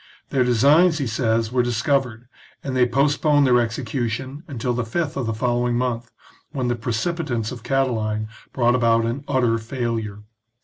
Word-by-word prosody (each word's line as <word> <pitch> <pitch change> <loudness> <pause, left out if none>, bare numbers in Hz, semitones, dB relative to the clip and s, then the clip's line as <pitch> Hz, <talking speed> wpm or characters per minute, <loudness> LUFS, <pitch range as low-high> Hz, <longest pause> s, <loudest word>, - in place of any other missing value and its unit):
Their 130 -2 +3
designs, 145 +8 +4
he 140 - -1
says, 115 -1 0
were 125 0 +2
discovered, 120 0 -1 0.4
and 135 -2 -3
they 125 -1 +4
postponed 145 +3 +2
their 125 -2 +4
execution 120 +3 -3
until 125 -4 -2
the 125 0 -1
fifth 145 +7 -2
of 130 -4 -2
the 115 - -1
following 120 +1 0
month, 120 -1 -2 0.4
when 130 -4 -1
the 120 - +1
precipitance 120 0 -2
of 125 -2 -8
Catiline 115 -5 -1 0.2
brought 120 -2 +2
about 115 -2 +3
an 120 +5 -3
utter 125 -5 +1
failure. 115 -3 -4
120 Hz, 160 wpm, -22 LUFS, 115-135 Hz, 0.4 s, designs